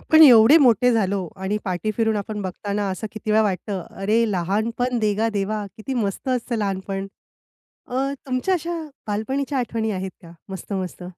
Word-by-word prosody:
आपण 315 0 +6
एवढे 250 0 +9
मोठे 250 -2 +5
झालो 200 -4 0 0.2
आणि 200 +2 0
पाठी 185 +3 -1
फिरून 220 -2 +2
आपण 210 +1 -4
बघताना 200 +2 -3
असं 190 +4 -4
किती 215 0 -5
वेळा 220 +1 +5
वाटतं, 195 -1 -2 0.2
अरे, 215 +4 +2
लहानपण 220 +7 0
देगा 215 0 +1
देवा. 210 0 -2
किती 240 +5 -5
मस्त 215 0 -2
असतं 250 -1 -1
लहानपण. 195 -1 -2 0.8
अ, 270 +2 -1
तुमच्या 260 +8 0
अशा 340 -1 -2 0.3
बालपणीच्या 265 +7 -2
आठवणी 225 -2 -1
आहेत 190 -1 -4
का 165 - -12 0.2
मस्त 190 +2 -6
मस्त? 185 -1 -4
215 Hz, 160 wpm, -23 LUFS, 195-245 Hz, 0.8 s, एवढे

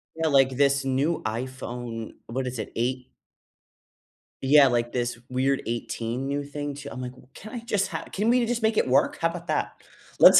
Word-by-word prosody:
Yeah, 160 0 0
like 135 -3 +4
this 140 0 +3
new 135 +5 +1
iPhone 120 -1 -4
what 130 +3 -2
is 125 -2 -4
it? - - -4
Eight 125 +2 -2 1.3
yeah, 140 +1 +7
like, 120 -2 +1
this 120 -1 -2
weird 130 +2 +1
18, 120 +2 -3
new 140 +1 -1
thing, 145 0 -4
too 140 0 -8
I'm, - - -6
like, 125 -1 -4 0.2
"Can 215 +4 -10
I 240 - -3
just 210 -4 0
ha - - -4
can 210 +3 0
we 245 0 +4
just 235 0 -1
make 220 0 +3
it - - +2
work? 130 - +3
How 165 - +3
about 170 0 -7
that?" - - 0 0.5
Let's - - +10
135 Hz, 190 wpm, -26 LUFS, 125-160 Hz, 1.3 s, Let's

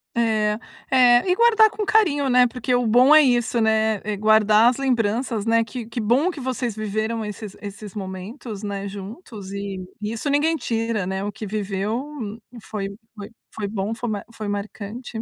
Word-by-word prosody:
É, 215 -2 +1 0.3
é, 250 +3 +5
e 360 - +4
guardar 445 -1 +5
com 420 0 -4
carinho, 305 -12 +3
né, 250 0 +5
porque 250 +1 -2
o 245 -1 +2
bom 250 +6 +6
é 310 - +9
isso, 240 -3 +2
né, 220 -1 +2
é 210 -1 -3
guardar 215 +1 +5
as 250 - -2
lembranças, 235 -3 0
né? 230 0 +3
Que 235 0 -7
que 230 +1 -4
bom 260 - +2
que 315 - -9
vocês 250 -3 -2
viveram 220 +1 -2
esses 210 -1 -7
esses 205 -1 -8
momentos, 200 +3 -7
né, 200 -1 -4
juntos, 200 - -9
e 195 -2 -5 0.2
isso 220 +6 -3
ninguém 300 +3 +2
tira, 225 - -2
né. 190 +1 -3
O 205 - -3
que 215 +1 -7
viveu 210 +6 -3 0.5
foi 200 -3 -4 0.3
foi 205 -1 -8 0.2
foi 205 -2 -4
bom, 205 +1 -3
foi 240 0 -4
ma 205 -2 -3
foi 215 -2 -6
marcante. 215 +3 -5
220 Hz, 180 wpm, -22 LUFS, 205-250 Hz, 0.5 s, é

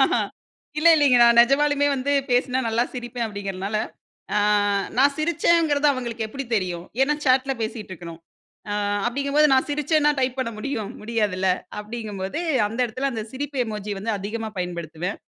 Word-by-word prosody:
ஆஹா. - - +3 0.6
இல்ல, 335 - +5
இல்லைங்க. 280 -5 +5
"நான் 235 0 +5
நெஜமாலுமே 285 +3 +3
வந்து 275 +2 -1 0.2
பேசுனா 250 +1 +2
நல்லா 230 +2 +1
சிரிப்பேன்." 240 -1 -4
அப்படீங்கிறனால 200 0 -4 0.6
அ - - +4 0.6
நான் 280 +2 +4
சிரிச்சேங்கிறது 310 -2 +2
அவங்களுக்கு 235 -3 -4
எப்படி 275 +5 -6
தெரியும்? 180 -4 -1 0.2
ஏன்னா 295 +3 +2
சாட்ல 265 0 +3
பேசிட்டுருக்கணும். 185 -7 -6 0.5
அ - - -1 0.3
அப்படீங்கம்போது 280 +4 +2
நான் 260 - +2
சிரிச்சேன்னா, 300 +1 +2
டைப் 255 -1 0
பண்ண 255 -3 -1
முடியும்? 225 -4 -3
முடியாதுல்ல. 210 -4 0 0.3
அப்படீங்கம்போது 210 - -5 0.3
அந்த 225 +3 -7
இடத்தில 260 +4 -2
அந்த 220 -2 -4
சிரிப்பு 280 +1 -5
எமோஜி 210 -1 -4
வந்து 220 +2 -2
அதிகமா 220 +3 -4
பயன்படுத்துவேன். 175 +1 -4
240 Hz, 140 wpm, -23 LUFS, 210-275 Hz, 0.6 s, இல்ல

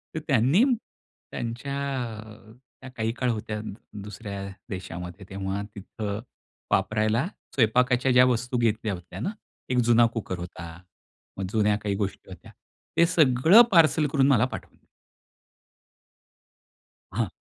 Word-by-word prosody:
तर - - -1
त्यांनी 135 - +4 0.7
त्यांच्या 120 +4 -4 0.5
अ, 110 0 -14 0.3
त्या 135 - -9
काही 115 -3 -2
काळ 125 +1 -1
होत्या 105 -1 -4 0.4
दुसऱ्या 100 -1 -7 0.2
देशामध्ये, 90 0 -7
तेव्हा 95 +1 -3
तिथं 100 +1 -5 0.5
वापरायला 110 - +1 0.3
स्वयंपाकाच्या 125 +2 +3
ज्या 125 0 +7
वस्तू 125 0 0
घेतल्या 110 -2 0
होत्या 90 -1 -9
ना. 185 - -2 0.4
1 125 - 0
जुना 120 0 +6
कुकर 100 -5 -4
होता. 85 -1 -8 0.7
मग 95 - -2
जुन्या 105 -1 +2
काही 100 -2 -1
गोष्टी 100 -1 -4
होत्या. 90 -3 -12 0.5
ते 170 - +6
सगळं 160 - +6
पार्सल 160 -3 +5
करून 135 -2 +3
मला 125 -4 +4
पाठवलं. 130 - -9 2.3
हां. 110 -3 0
110 Hz, 120 wpm, -26 LUFS, 100-125 Hz, 2.3 s, ज्या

